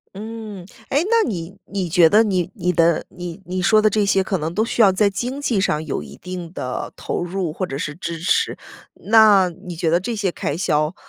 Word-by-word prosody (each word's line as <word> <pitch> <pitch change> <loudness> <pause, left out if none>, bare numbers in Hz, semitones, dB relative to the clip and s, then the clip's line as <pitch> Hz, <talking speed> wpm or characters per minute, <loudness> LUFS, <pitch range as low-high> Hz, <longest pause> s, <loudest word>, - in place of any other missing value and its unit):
嗯。 215 -2 -7 0.2
诶， 285 +4 +2
那 460 -1 +3
你 175 -3 -5
你 190 -3 -3
觉 170 0 +6
得 220 +2 +5
你 185 -4 0
你 180 -1 0
的 170 -1 +2
你 175 0 -8
你 185 +1 -3
说 215 +3 +4
的 215 - +4
这 210 0 +1
些 195 -1 +2
可 190 -1 -1
能 160 +1 -3
都 215 - +1
需 230 - 0
要 200 -3 +7
在 200 +2 +2
经 250 +8 -4
济 235 -8 0
上 155 -4 0
有 140 - -3
一 70 -1 -11
定 180 -2 -7
的 125 -6 -4
投 - - -4
入， 175 -1 -3
或 185 +4 -3
者 135 - -5
是 150 +1 -4
支 170 +1 -5
持。 175 - +1 0.4
那 210 -4 +5
你 175 +1 -9
觉 165 0 0
得 170 +2 +3
这 230 +5 -4
些 200 -4 -1
开 145 - -3
销， 155 -1 0
185 Hz, 240 characters per minute, -21 LUFS, 170-210 Hz, 0.4 s, 要